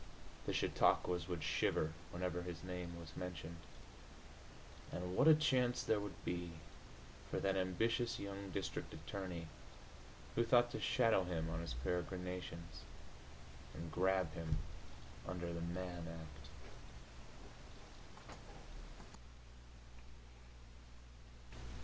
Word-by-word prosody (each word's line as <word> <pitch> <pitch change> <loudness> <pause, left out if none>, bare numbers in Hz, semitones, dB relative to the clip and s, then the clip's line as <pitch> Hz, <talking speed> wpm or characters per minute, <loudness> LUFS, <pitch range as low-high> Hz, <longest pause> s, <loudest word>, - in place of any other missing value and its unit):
The - - +2
chautauquas 90 -1 +3
would 85 -3 -2
shiver 80 +1 +2 0.2
whenever 90 0 -1
his 85 -2 -5
name 90 -1 -4
was 85 0 -9
mentioned.... 85 -2 -4 1.3
And 90 +1 -2
what 135 - +6
a 160 - +11
chance 125 -5 +3
there 110 - +3
would 100 -1 -6
be 85 -1 -1 0.8
for - - 0
that 95 -1 +2
ambitious 115 +6 +2
young 100 0 -4
district 95 -1 -3
attorney 90 -4 -4 0.9
who 120 - +4
thought 120 0 +5
to 145 - -2
shadow 115 -7 +4
him 80 -2 -1
on 80 - -1
his 80 -7 -3
peregrinations 90 +3 -3 0.9
and 80 +1 -5
grab 95 -2 +3
him 80 -3 -1 0.7
under 85 -1 -2
the 85 - -3
Mann 85 0 -3
Act! 75 -4 -8
90 Hz, 100 wpm, -40 LUFS, 85-95 Hz, 1.3 s, a